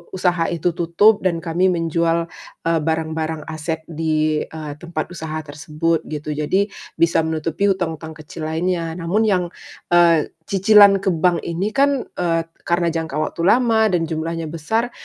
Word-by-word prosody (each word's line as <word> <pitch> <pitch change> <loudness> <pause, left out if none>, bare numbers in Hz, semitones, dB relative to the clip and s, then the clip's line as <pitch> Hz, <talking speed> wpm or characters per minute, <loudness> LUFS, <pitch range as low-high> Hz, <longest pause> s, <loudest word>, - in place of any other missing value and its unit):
usaha 180 -2 +1
itu 170 +1 0
tutup 175 +6 +4
dan 170 -3 +1
kami 175 +3 +1
menjual, 165 0 0 0.4
eee, 165 -1 +2
barang-barang 160 -1 -2
aset 160 0 -4
di, 155 -1 0
eee, 155 -2 -7
tempat 170 0 -5
usaha 160 -2 -6
tersebut, 155 +3 -2
gitu. 150 0 -5
Jadi, 190 +7 0 0.2
bisa 170 0 +3
menutupi 160 +5 -1
utang-utang 160 -4 -2
kecil 155 +1 -7
lainnya 165 0 -1
namun 190 +6 0
yang, 185 -3 +2 0.5
eee, 170 -3 +4 0.2
cicilan 200 0 +6
ke 190 - +2
bank 170 0 +1
ini 190 +7 -3
kan, 280 -2 +2
eee, 165 -2 0 0.2
karna 170 0 +2
jangka 160 -3 -3
waktu 165 +2 -2
lama 225 -1 +4
dan 175 -2 +1
jumlahnya 165 +1 -3
besar, 220 +10 -2
165 Hz, 150 wpm, -20 LUFS, 160-180 Hz, 0.5 s, cicilan